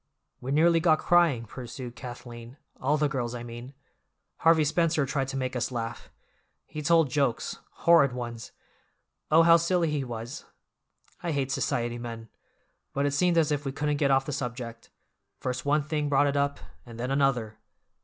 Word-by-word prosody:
"We 130 Hz, -, -5 dB
nearly 165 Hz, +3 st, +4 dB
got 160 Hz, -1 st, +4 dB
crying," 165 Hz, -9 st, +3 dB
pursued 125 Hz, +1 st, -8 dB
Kathleen, 120 Hz, 0 st, -9 dB, 0.2 s
"all 145 Hz, +4 st, +2 dB
the 150 Hz, 0 st, +2 dB
girls, 125 Hz, -4 st, -3 dB
I 120 Hz, -, -6 dB
mean. 120 Hz, +3 st, -9 dB, 0.6 s
Harvey 165 Hz, -1 st, +4 dB
Spencer 160 Hz, -1 st, +1 dB
tried 135 Hz, 0 st, -1 dB
to 135 Hz, 0 st, -4 dB
make 130 Hz, -1 st, -2 dB
us 125 Hz, -, -1 dB
laugh; 115 Hz, -2 st, -5 dB, 0.6 s
he 155 Hz, -, -7 dB
told 160 Hz, -2 st, +3 dB
jokes—horrid 140 Hz, +3 st, +2 dB
ones. 120 Hz, -2 st, -6 dB, 0.8 s
Oh, 160 Hz, +2 st, +6 dB
how 165 Hz, 0 st, +7 dB
silly 170 Hz, -1 st, +1 dB
he 145 Hz, -2 st, -1 dB
was! 120 Hz, +2 st, -7 dB, 0.8 s
I 175 Hz, -, -3 dB
hate 135 Hz, -3 st, -1 dB
society 120 Hz, -3 st, -1 dB
men. 115 Hz, -1 st, -7 dB, 0.6 s
But 140 Hz, +1 st, 0 dB
it 145 Hz, -, +1 dB
seemed 175 Hz, +3 st, +2 dB
as 155 Hz, -2 st, +3 dB
if 145 Hz, -1 st, -1 dB
we 135 Hz, -, -3 dB
couldn't 150 Hz, +1 st, -1 dB
get 140 Hz, -1 st, +2 dB
off 135 Hz, 0 st, +3 dB
the 145 Hz, -, -4 dB
subject; 120 Hz, -3 st, -5 dB, 0.5 s
first 125 Hz, +2 st, -4 dB
one 150 Hz, +1 st, +3 dB
thing 150 Hz, 0 st, -2 dB
brought 145 Hz, 0 st, +4 dB
it 140 Hz, 0 st, 0 dB
up, 140 Hz, 0 st, +1 dB, 0.3 s
and 115 Hz, +4 st, -11 dB
then 125 Hz, +2 st, -2 dB
another. 125 Hz, -6 st, 0 dB
135 Hz, 170 wpm, -27 LUFS, 120-150 Hz, 0.8 s, how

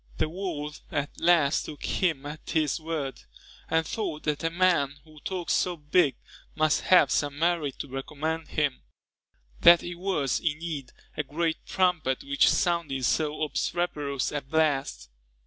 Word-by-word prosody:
The -, -, 0 dB
world 155 Hz, -4 st, -5 dB
at 145 Hz, -1 st, -2 dB
last 165 Hz, -4 st, +3 dB
took 150 Hz, -, -7 dB
him 160 Hz, -7 st, 0 dB
at 150 Hz, +1 st, -8 dB
his 155 Hz, -1 st, +1 dB
word; 155 Hz, -4 st, -4 dB, 0.5 s
and 160 Hz, 0 st, +2 dB
thought 160 Hz, -6 st, -3 dB
that 150 Hz, 0 st, -1 dB
a 165 Hz, -, +2 dB
man 170 Hz, -5 st, +2 dB
who 155 Hz, -1 st, -16 dB
talked 180 Hz, +1 st, -3 dB
so 180 Hz, -1 st, +1 dB
big, 150 Hz, -2 st, +2 dB, 0.4 s
must 155 Hz, -1 st, +2 dB
have 175 Hz, -7 st, +5 dB
some 145 Hz, -1 st, 0 dB
merit 165 Hz, -4 st, 0 dB
to -, -, -5 dB
recommend 150 Hz, +4 st, -4 dB
him, 145 Hz, -4 st, -1 dB, 0.8 s
that 170 Hz, 0 st, +8 dB
it 175 Hz, -, -5 dB
was, 175 Hz, -8 st, -1 dB
indeed, 155 Hz, -4 st, -3 dB, 0.2 s
a -, -, 0 dB
great 160 Hz, +3 st, -2 dB
trumpet 175 Hz, -8 st, +1 dB
which 140 Hz, 0 st, +3 dB
sounded 165 Hz, -7 st, 0 dB
so 155 Hz, +4 st, 0 dB
obstreperous 145 Hz, -2 st, -1 dB
a 145 Hz, -, -2 dB
blast. 140 Hz, -, 0 dB
155 Hz, 145 wpm, -27 LUFS, 145-170 Hz, 0.8 s, that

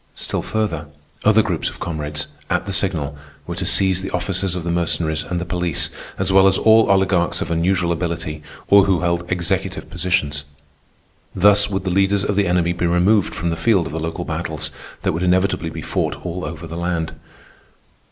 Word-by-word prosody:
Still -, -, -2 dB
further, 85 Hz, -8 st, -2 dB, 0.4 s
other -, -, +5 dB
groups -, -, -1 dB
of -, -, -12 dB
comrades, 75 Hz, -2 st, -3 dB, 0.2 s
at 90 Hz, -1 st, 0 dB
the 100 Hz, -, -3 dB
signal, 85 Hz, -8 st, 0 dB, 0.3 s
were 85 Hz, -, -5 dB
to 90 Hz, 0 st, -2 dB
seize 95 Hz, -1 st, +4 dB
the 95 Hz, -, -4 dB
officers 90 Hz, 0 st, -1 dB
of 90 Hz, -, -4 dB
the 85 Hz, -, -2 dB
Mercenaries 85 Hz, -2 st, 0 dB
and 90 Hz, -1 st, -3 dB
the 90 Hz, -, -4 dB
police, 90 Hz, -3 st, -1 dB, 0.3 s
as 95 Hz, 0 st, +1 dB
well 95 Hz, 0 st, +6 dB
as 95 Hz, -, +4 dB
all 110 Hz, 0 st, +5 dB
Oligarchs 95 Hz, -3 st, +2 dB
of -, -, -3 dB
unusual 85 Hz, +1 st, +1 dB
ability 85 Hz, -2 st, -3 dB, 0.3 s
or 100 Hz, -1 st, +6 dB
who 95 Hz, -3 st, +1 dB
held 85 Hz, 0 st, -1 dB
executive 90 Hz, +2 st, -2 dB
positions. 80 Hz, -5 st, 0 dB, 0.9 s
Thus 100 Hz, +2 st, +5 dB
would 95 Hz, -2 st, -2 dB
the 90 Hz, -, -2 dB
leaders 100 Hz, +1 st, +2 dB
of 100 Hz, -, -1 dB
the 100 Hz, 0 st, +2 dB
enemy 85 Hz, -1 st, +1 dB
be 85 Hz, 0 st, -1 dB
removed 90 Hz, +4 st, +2 dB
from 85 Hz, -4 st, -2 dB
the -, -, -1 dB
field 100 Hz, -1 st, +2 dB
of -, -, -6 dB
the 80 Hz, -, -2 dB
local 80 Hz, +2 st, -4 dB
battles 80 Hz, -2 st, -3 dB, 0.3 s
that -, -, +1 dB
would 80 Hz, -, -3 dB
inevitably 90 Hz, -1 st, +1 dB
be -, -, -7 dB
fought -, -, -2 dB
all 90 Hz, -1 st, -4 dB
over 80 Hz, +3 st, -7 dB
the 85 Hz, +1 st, -7 dB
land. 85 Hz, -2 st, -2 dB
90 Hz, 190 wpm, -20 LUFS, 85-95 Hz, 0.9 s, well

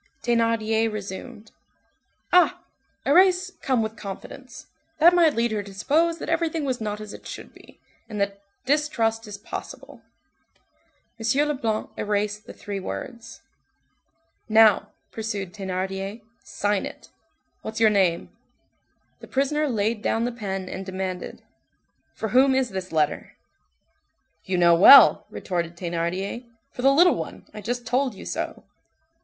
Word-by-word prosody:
Thénardier 225 Hz, -1 st, +1 dB
resumed:— 215 Hz, +2 st, -8 dB, 0.8 s
"Ah! 355 Hz, 0 st, +4 dB, 0.4 s
erase 365 Hz, +5 st, +4 dB
'come 255 Hz, -5 st, +1 dB
with 220 Hz, 0 st, -5 dB
confidence'; 230 Hz, +6 st, -9 dB, 0.3 s
that 335 Hz, +3 st, +6 dB
might 335 Hz, -4 st, +4 dB
lead 230 Hz, 0 st, +1 dB
her 215 Hz, -1 st, -1 dB
to 200 Hz, -1 st, -11 dB
suppose 325 Hz, +10 st, +1 dB
that -, -, -7 dB
everything 325 Hz, -2 st, -1 dB
was 255 Hz, -3 st, -2 dB
not 210 Hz, -1 st, -3 dB
as 215 Hz, -1 st, -8 dB
it -, -, -11 dB
should -, -, -9 dB
be, -, -, -18 dB, 0.3 s
and 210 Hz, -2 st, -5 dB
that 200 Hz, 0 st, -2 dB, 0.2 s
distrust 235 Hz, -6 st, 0 dB
is 205 Hz, -1 st, -7 dB
possible." 205 Hz, -, -9 dB, 1.2 s
M. 265 Hz, +7 st, +1 dB
Leblanc 230 Hz, -7 st, -2 dB
erased 210 Hz, 0 st, -2 dB
the -, -, -9 dB
three 200 Hz, -2 st, -6 dB
words. 230 Hz, +4 st, -8 dB, 1.1 s
"Now," 215 Hz, -1 st, +5 dB, 0.2 s
pursued 205 Hz, -5 st, -4 dB
Thénardier, 195 Hz, +2 st, -4 dB, 0.2 s
"sign 205 Hz, -1 st, -1 dB
it. -, -, -13 dB, 0.5 s
What's 220 Hz, 0 st, -6 dB
your 220 Hz, -1 st, +5 dB
name?" 185 Hz, -5 st, +1 dB, 0.9 s
The -, -, -12 dB
prisoner 295 Hz, +2 st, 0 dB
laid 220 Hz, -1 st, -1 dB
down 225 Hz, +1 st, 0 dB
the 245 Hz, -, -1 dB
pen 195 Hz, -5 st, -5 dB
and 190 Hz, +1 st, -6 dB
demanded:— 185 Hz, -1 st, -5 dB, 0.7 s
"For 220 Hz, -, -4 dB
whom 260 Hz, +4 st, +4 dB
is 260 Hz, -4 st, 0 dB
this 190 Hz, -1 st, -5 dB
letter?" 155 Hz, -2 st, -1 dB, 1.1 s
"You 185 Hz, -1 st, -1 dB
know 170 Hz, -1 st, +5 dB
well," 195 Hz, +11 st, +8 dB
retorted 170 Hz, -2 st, -4 dB
Thénardier, 175 Hz, +6 st, -3 dB, 0.3 s
"for -, -, -7 dB
the 270 Hz, +2 st, +5 dB
little 350 Hz, +6 st, +5 dB
one -, -, -7 dB
I 210 Hz, -, -8 dB
just 245 Hz, +3 st, -4 dB
told 250 Hz, 0 st, 0 dB
you -, -, -10 dB
so." -, -, -4 dB
220 Hz, 135 wpm, -24 LUFS, 195-260 Hz, 1.2 s, well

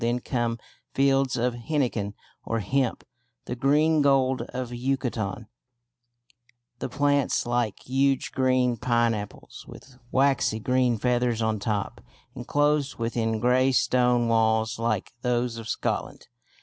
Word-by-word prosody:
Then 120 Hz, +1 st, +1 dB
come 120 Hz, -2 st, -2 dB, 0.4 s
fields 135 Hz, -1 st, +2 dB
of 120 Hz, +1 st, 0 dB
henequen 120 Hz, -6 st, -2 dB, 0.3 s
or 115 Hz, -, -2 dB
hemp, 130 Hz, +4 st, -1 dB, 0.4 s
"the 125 Hz, -, -4 dB
Green 150 Hz, +4 st, +3 dB
Gold 130 Hz, -3 st, +3 dB
of 125 Hz, -1 st, -5 dB
Yucatan," 120 Hz, -4 st, -2 dB, 1.3 s
the -, -, -4 dB
plants 145 Hz, -1 st, +1 dB
like 120 Hz, -3 st, -1 dB
huge 135 Hz, +1 st, +1 dB
green 130 Hz, -2 st, +1 dB
pineapples 115 Hz, -3 st, -2 dB
with 130 Hz, -2 st, -14 dB
waxy 135 Hz, -5 st, +2 dB
green 125 Hz, 0 st, +1 dB
feathers 120 Hz, -1 st, 0 dB
on 110 Hz, -1 st, 0 dB
top, 105 Hz, -1 st, -3 dB, 0.3 s
enclosed 145 Hz, +2 st, 0 dB
within 115 Hz, -1 st, -1 dB
grey 125 Hz, +3 st, +3 dB
stone 125 Hz, -2 st, +2 dB
walls 110 Hz, 0 st, +1 dB
like 115 Hz, -4 st, -1 dB
those 125 Hz, -1 st, 0 dB
of 110 Hz, -1 st, -7 dB
Scotland. -, -, -3 dB
125 Hz, 120 wpm, -26 LUFS, 115-135 Hz, 1.3 s, Green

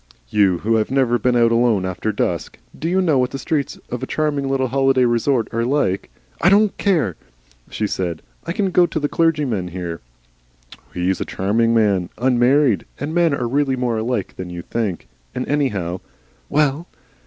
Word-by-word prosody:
"You 95 Hz, -1 st, +3 dB
who 115 Hz, 0 st, +3 dB
have 110 Hz, -, 0 dB
never 130 Hz, -3 st, +2 dB
been 125 Hz, +3 st, +1 dB
out 115 Hz, -1 st, +4 dB
alone 115 Hz, -5 st, +2 dB
after 95 Hz, +4 st, -2 dB
dusk? -, -, -2 dB, 0.2 s
Do 165 Hz, -, -3 dB
you 190 Hz, +1 st, +2 dB
know 155 Hz, -7 st, +3 dB
what 125 Hz, 0 st, +1 dB
the 135 Hz, -, -5 dB
streets 140 Hz, 0 st, -2 dB
of 125 Hz, -, -3 dB
a 130 Hz, -, -4 dB
charming 145 Hz, -3 st, -1 dB
little 130 Hz, -1 st, 0 dB
holiday 135 Hz, -1 st, +3 dB
resort 120 Hz, 0 st, +1 dB
are 115 Hz, +1 st, 0 dB
like 120 Hz, -7 st, 0 dB, 0.2 s
" -, -, -24 dB
"I 175 Hz, -, +5 dB
don't 205 Hz, +1 st, +4 dB
care," 155 Hz, -, +1 dB, 0.5 s
she 110 Hz, -, -2 dB
said. 90 Hz, -5 st, -3 dB, 0.2 s
"I -, -, -4 dB
can 190 Hz, +1 st, 0 dB
go 175 Hz, 0 st, +4 dB
to 160 Hz, -, -3 dB
the 145 Hz, -, 0 dB
clergyman 145 Hz, -, 0 dB
here." 85 Hz, -2 st, -5 dB, 0.9 s
"He's 90 Hz, +1 st, -1 dB
a -, -, +2 dB
charming 115 Hz, +4 st, +1 dB
man. 100 Hz, -5 st, +2 dB
Unmarried. 125 Hz, 0 st, +3 dB
And 145 Hz, +3 st, -3 dB
men 170 Hz, -4 st, +3 dB
are 125 Hz, -3 st, -2 dB
really 135 Hz, +1 st, +1 dB
more 120 Hz, -3 st, -1 dB
alike 115 Hz, -3 st, -2 dB
than 90 Hz, -1 st, -6 dB
you 85 Hz, -1 st, -7 dB
think. 105 Hz, -6 st, -3 dB, 0.3 s
And 125 Hz, -, -3 dB
anyhow 105 Hz, -12 st, -1 dB, 0.3 s
" -, -, -36 dB
"Well?" 150 Hz, +3 st, +1 dB
125 Hz, 190 wpm, -20 LUFS, 105-145 Hz, 0.9 s, I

